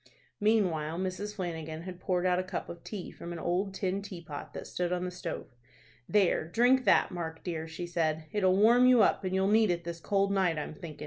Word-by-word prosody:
Meanwhile 180 Hz, -8 st, +1 dB
Mrs. 190 Hz, +3 st, -3 dB
Flanagan 160 Hz, -4 st, -5 dB
had 180 Hz, -1 st, -8 dB
poured 180 Hz, -1 st, 0 dB
out 180 Hz, 0 st, +3 dB
a -, -, 0 dB
cup 185 Hz, 0 st, -5 dB
of 170 Hz, -1 st, -9 dB
tea 200 Hz, -5 st, -6 dB
from 170 Hz, -, -8 dB
an 170 Hz, -, -5 dB
old 180 Hz, +4 st, -1 dB
tin 190 Hz, 0 st, -1 dB
teapot 170 Hz, -7 st, -8 dB
that -, -, -6 dB
stood 180 Hz, -1 st, -2 dB
on 180 Hz, 0 st, -1 dB
the 180 Hz, -, -3 dB
stove. 175 Hz, -7 st, -6 dB, 0.6 s
"There, 200 Hz, -6 st, +3 dB
drink 245 Hz, +7 st, +3 dB
that, -, -, +4 dB
Mark 165 Hz, -2 st, -5 dB
dear," 165 Hz, -3 st, -4 dB
she 160 Hz, +2 st, -6 dB
said. 160 Hz, -2 st, -1 dB
"It'll 190 Hz, -3 st, +3 dB
warm 240 Hz, +5 st, +6 dB
you 250 Hz, -4 st, +7 dB
up, -, -, +2 dB
and 185 Hz, 0 st, -1 dB
you'll 190 Hz, 0 st, +2 dB
need 215 Hz, 0 st, +4 dB
it 170 Hz, -1 st, 0 dB
this 170 Hz, 0 st, -6 dB
cold 200 Hz, +3 st, +1 dB
night, 185 Hz, -5 st, +2 dB
I'm 150 Hz, -, -4 dB
thinkin'." 155 Hz, -3 st, -9 dB
180 Hz, 215 wpm, -30 LUFS, 170-200 Hz, 0.6 s, you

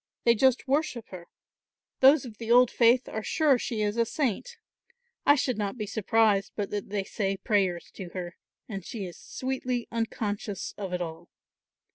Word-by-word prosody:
They 235 Hz, -, +6 dB
just 260 Hz, +3 st, +2 dB
worship 275 Hz, -4 st, -1 dB
her. 175 Hz, -2 st, -9 dB, 0.7 s
Those 275 Hz, +1 st, +6 dB
of 220 Hz, -4 st, -10 dB
the 230 Hz, -1 st, -6 dB
old 250 Hz, 0 st, +6 dB
faith 240 Hz, +2 st, +4 dB
are 220 Hz, -, -4 dB
sure 280 Hz, +2 st, +2 dB
she 220 Hz, -3 st, -2 dB
is 210 Hz, +2 st, -1 dB
a 230 Hz, -, +4 dB
saint. 285 Hz, -, -2 dB, 0.7 s
I 285 Hz, -, +8 dB
should 255 Hz, -5 st, -1 dB
not 205 Hz, +3 st, -2 dB
be 215 Hz, -, -3 dB
surprised 210 Hz, -1 st, +2 dB
but 205 Hz, -2 st, -3 dB
that 205 Hz, -1 st, -4 dB
they 200 Hz, -1 st, -1 dB
say 195 Hz, -1 st, -2 dB
prayers 190 Hz, -5 st, 0 dB
to 185 Hz, -3 st, -8 dB
her, 175 Hz, -1 st, -5 dB, 0.3 s
and 195 Hz, -4 st, -6 dB
she 205 Hz, +1 st, -5 dB
is 175 Hz, -, -8 dB
sweetly 255 Hz, -2 st, -3 dB
unconscious 210 Hz, -3 st, -3 dB
of 195 Hz, -3 st, -5 dB
it 180 Hz, 0 st, -1 dB
all. 160 Hz, -1 st, -8 dB
220 Hz, 175 wpm, -28 LUFS, 195-250 Hz, 0.7 s, I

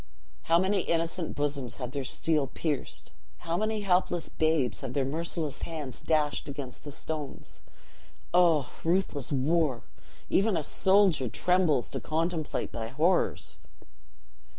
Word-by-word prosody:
How 165 Hz, -, +5 dB
many 190 Hz, +3 st, +2 dB
innocent 165 Hz, 0 st, -1 dB
bosoms 140 Hz, -4 st, -2 dB
have 125 Hz, -2 st, -5 dB
their 140 Hz, -1 st, -3 dB
steel 150 Hz, +2 st, +1 dB
pierced! 145 Hz, +1 st, -3 dB, 0.3 s
How 170 Hz, -1 st, -3 dB
many 215 Hz, +2 st, 0 dB
helpless 180 Hz, -3 st, +1 dB
babes 155 Hz, -5 st, +1 dB
have 130 Hz, -2 st, -5 dB
their 135 Hz, -1 st, +1 dB
merciless 155 Hz, +1 st, -2 dB
hands 150 Hz, -6 st, -5 dB
dashed 150 Hz, -2 st, 0 dB
against 135 Hz, -3 st, -7 dB
the 145 Hz, -, -7 dB
stones! 140 Hz, -, -5 dB, 0.7 s
Oh, 165 Hz, -7 st, +4 dB
ruthless 165 Hz, -6 st, 0 dB
war! 145 Hz, -1 st, +1 dB, 0.4 s
even 200 Hz, -1 st, +2 dB
a 155 Hz, -, -1 dB
soldier 190 Hz, -, +3 dB
trembles 170 Hz, -1 st, +2 dB
to -, -, -4 dB
contemplate 160 Hz, 0 st, -2 dB
thy 115 Hz, -1 st, -4 dB
horrors." 160 Hz, +9 st, 0 dB
155 Hz, 130 wpm, -29 LUFS, 140-175 Hz, 0.7 s, How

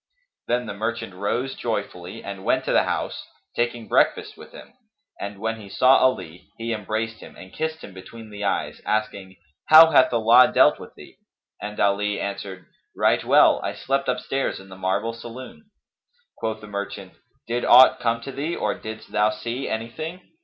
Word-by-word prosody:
Then 120 Hz, +1 st, 0 dB
the -, -, -5 dB
merchant 110 Hz, -1 st, -4 dB
rose 115 Hz, +8 st, -2 dB
joyfully 100 Hz, -6 st, -5 dB
and 100 Hz, -1 st, -7 dB
went -, -, +1 dB
to -, -, -1 dB
the -, -, +3 dB
house, -, -, -3 dB, 0.3 s
taking 120 Hz, -1 st, -2 dB
breakfast -, -, +1 dB
with -, -, -14 dB
him; -, -, -13 dB, 0.5 s
and, 100 Hz, 0 st, -6 dB
when 110 Hz, +2 st, -4 dB
he 100 Hz, -, -12 dB
saw 130 Hz, +6 st, +5 dB
Ali, 90 Hz, -10 st, -1 dB
he 115 Hz, 0 st, -3 dB
embraced 110 Hz, +1 st, -3 dB
him -, -, -13 dB
and 95 Hz, -, -13 dB
kissed 160 Hz, 0 st, -4 dB
him 100 Hz, -, -10 dB
between 110 Hz, +4 st, -12 dB
the 105 Hz, 0 st, -7 dB
eyes, 100 Hz, -, -2 dB
asking, 105 Hz, -3 st, -3 dB, 0.3 s
"How 160 Hz, +1 st, +9 dB
hath 130 Hz, -, +5 dB
Allah 115 Hz, +2 st, +5 dB
dealt -, -, +4 dB
with -, -, -12 dB
thee?"; -, -, -15 dB, 0.4 s
and 105 Hz, 0 st, -6 dB
Ali 100 Hz, +1 st, +1 dB
answered, 100 Hz, -2 st, -6 dB, 0.3 s
"Right -, -, +2 dB
well, -, -, +5 dB
I -, -, -3 dB
slept 135 Hz, +1 st, -2 dB
upstairs 125 Hz, +2 st, -2 dB
in 95 Hz, 0 st, -14 dB
the 95 Hz, -, -10 dB
marble 95 Hz, +5 st, -1 dB
saloon." 130 Hz, -, -11 dB, 0.7 s
Quoth 110 Hz, -1 st, -4 dB
the 105 Hz, -, -11 dB
merchant, 100 Hz, -2 st, -6 dB, 0.3 s
"Did 120 Hz, +1 st, -2 dB
aught 130 Hz, +1 st, +7 dB
come 115 Hz, -1 st, 0 dB
to 135 Hz, -, -7 dB
thee 150 Hz, +5 st, -3 dB
or 105 Hz, -, -1 dB
didst 110 Hz, 0 st, -9 dB
thou 105 Hz, +1 st, +3 dB
see 115 Hz, +5 st, -4 dB
any 110 Hz, +1 st, -3 dB
thing?" 165 Hz, +6 st, -7 dB
110 Hz, 180 wpm, -23 LUFS, 100-125 Hz, 0.7 s, How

